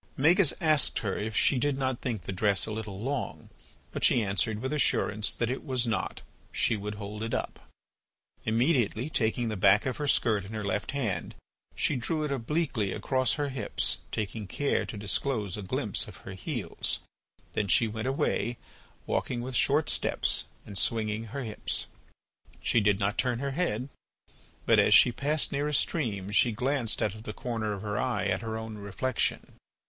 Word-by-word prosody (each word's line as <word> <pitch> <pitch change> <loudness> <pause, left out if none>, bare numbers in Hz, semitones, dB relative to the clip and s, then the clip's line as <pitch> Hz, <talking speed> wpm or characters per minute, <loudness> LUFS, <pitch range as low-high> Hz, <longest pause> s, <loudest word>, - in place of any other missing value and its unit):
Magis 165 +4 +5
asked 155 -4 +4
her 95 - 0
if 110 +1 -3
she 135 - +4
did 145 0 +1
not 130 -2 -1
think 115 -6 -3
the - - -5
dress 100 +1 +2
a - - -5
little 105 -3 -5
long, 135 +6 -4 0.4
but - - -5
she 120 - +5
answered 100 +2 0
with 130 +5 -3
assurance 105 -8 +2
that 115 0 -1
it 130 - -4
was 130 -4 0
not—she 115 0 -1
would 105 0 -5
hold 105 +1 -7
it 115 +1 -2
up. - - -4 0.8
Immediately, 120 +2 +1
taking 115 -2 0
the 110 - -2
back 100 +2 +4
of 130 - -2
her 145 - -2
skirt 110 -7 +3
in 100 +3 -9
her 105 -1 -3
left 105 +1 -2
hand, 110 - -2 0.4
she - - +1
drew 155 +6 -1
it 150 - -2
obliquely 130 - -1
across 130 +3 +1
her 145 -1 -1
hips, 130 -6 -1
taking 105 -1 -3
care 145 +8 0
to 110 - -6
disclose 105 0 0
a 105 - -5
glimpse 95 - -2
of - - -11
her 95 - -6
heels. 95 - -3 0.5
Then 105 - 0
she 115 +5 +5
went 110 +2 -4
away, 125 -3 0 0.5
walking 120 - -1
with 130 +1 -4
short 145 +4 +3
steps - - +2 0.2
and 100 - -9
swinging 110 +3 0
her 125 +5 -5
hips. 110 -3 -2 0.7
She 120 - +2
did 105 -1 +3
not 100 +1 0
turn 125 -2 +1
her 140 +2 -2
head, 135 -6 -1 0.8
but - - +5
as - - +6
she 125 - +7
passed 145 +5 +1
near 145 +1 0
a 150 - -2
stream 105 - 0
she 115 +3 +4
glanced 125 +1 0
out 105 - 0
of 110 - -10
the 110 - -6
corner 115 -4 -3
of 100 -1 -5
her 105 -1 -2
eye 120 -6 0
at 95 -1 0
her 110 -1 -3
own 110 -1 -6
reflection. 105 +5 -2
115 Hz, 185 wpm, -29 LUFS, 105-135 Hz, 0.8 s, she